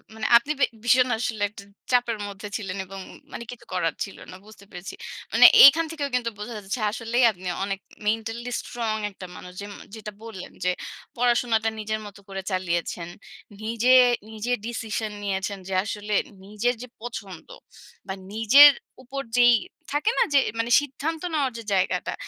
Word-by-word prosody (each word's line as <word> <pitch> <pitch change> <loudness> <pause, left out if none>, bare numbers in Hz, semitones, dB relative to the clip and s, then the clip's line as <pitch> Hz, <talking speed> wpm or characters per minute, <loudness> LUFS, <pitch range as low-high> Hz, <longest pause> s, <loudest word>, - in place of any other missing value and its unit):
মানে 220 - -4
আপনি 275 +6 -2
বে - - +6 0.2
ভীষণ 250 +1 +4
আসলে 220 -2 -3
একটা 200 -1 -12 0.3
চাপের 240 -3 +2
মধ্যে 200 +1 -8
ছিলেন 195 -3 -5
এবং 195 +1 -9
উম - - -13 0.2
মানে 235 - -6
কিছু 245 - -12
করার 165 -3 0
ছিল 195 - -9
না। - - -9
বুঝতে 215 -2 -15
পেরেছি। 180 +1 -8 0.4
মানে - - +8 0.2
এইখান 320 +4 +8
থেকেও 290 -3 -3
কিন্তু 235 -2 0
বোঝা 220 +2 -6
যাচ্ছে 205 +4 -4
আসলেই 235 +2 0
আপনি 185 -1 -10 0.2
অনেক 195 -1 -3 0.3
mentally 225 +3 -2
strong 225 -3 -3
একটা 190 -1 -10
মানুষ 180 - -10
যেম 205 0 -7 0.2
যেটা 210 -1 -7
বললেন 215 -5 -9
যে 180 - +3 0.5
পড়াশোনাটা 235 -2 +2
নিজের 215 0 -2
মতো 200 -1 -11
করে 195 0 -4
চালিয়েছেন। 175 -2 -2 0.5
নিজে 230 +3 +2 0.4
নিজে 220 +3 -4
decision 220 -2 -3
নিয়েছেন 195 0 -2
যে 190 - -4
আসলে 210 0 -4 0.3
নিজের 215 +4 0
যে 250 - -7
পছন্দ 210 -7 -8 0.6
বা 190 - -3 0.2
নিজের 270 +7 +8 0.3
উপর 275 +2 -5 0.2
যেই 240 -1 +7 0.4
থাকে 300 +11 +1
না, - - +5
যে 280 - +7 0.2
মানে 235 +1 -1
সিদ্ধান্ত 295 +3 -4
নেওয়ার 275 -4 +1
যে 230 - -7
জায়গাটা, 185 -1 0
220 Hz, 165 wpm, -25 LUFS, 200-245 Hz, 0.6 s, মানে